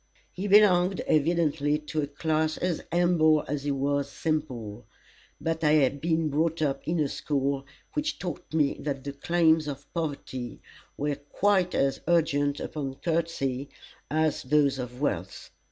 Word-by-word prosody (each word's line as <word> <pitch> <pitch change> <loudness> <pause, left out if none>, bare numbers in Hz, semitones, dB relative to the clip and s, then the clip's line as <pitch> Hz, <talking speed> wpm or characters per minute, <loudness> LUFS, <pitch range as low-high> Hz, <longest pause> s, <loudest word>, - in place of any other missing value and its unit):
He 190 +3 -4
belonged 190 -2 +5
evidently 150 -2 +2
to 150 +1 -3
a 145 - -2
class 155 +2 0
as 180 -2 -1
humble 165 -3 +3
as 145 0 -3
he - - 0
was 140 0 0
simple, 130 -11 -3 0.5
but 165 +2 -2
I 150 0 +4
had 140 -2 +3
been 160 -1 +1
brought 160 +3 0
up 135 -2 0
in 165 +1 0
a 150 - +2
school 140 -1 -2 0.3
which 300 0 -1
taught 175 -5 -6
me 150 -3 +1
that 140 -2 -3
the 140 0 -5
claims 160 +1 +2
of 145 0 -6
poverty 140 -7 -4 0.4
were 145 0 -1
quite 180 +5 +1
as 135 0 +1
urgent 145 -4 +2
upon 135 -3 -4
courtesy 145 -5 -1 0.4
as 155 0 +1
those 140 0 +2
of 125 +1 -6
wealth. 95 - -3
150 Hz, 150 wpm, -27 LUFS, 140-165 Hz, 0.5 s, belonged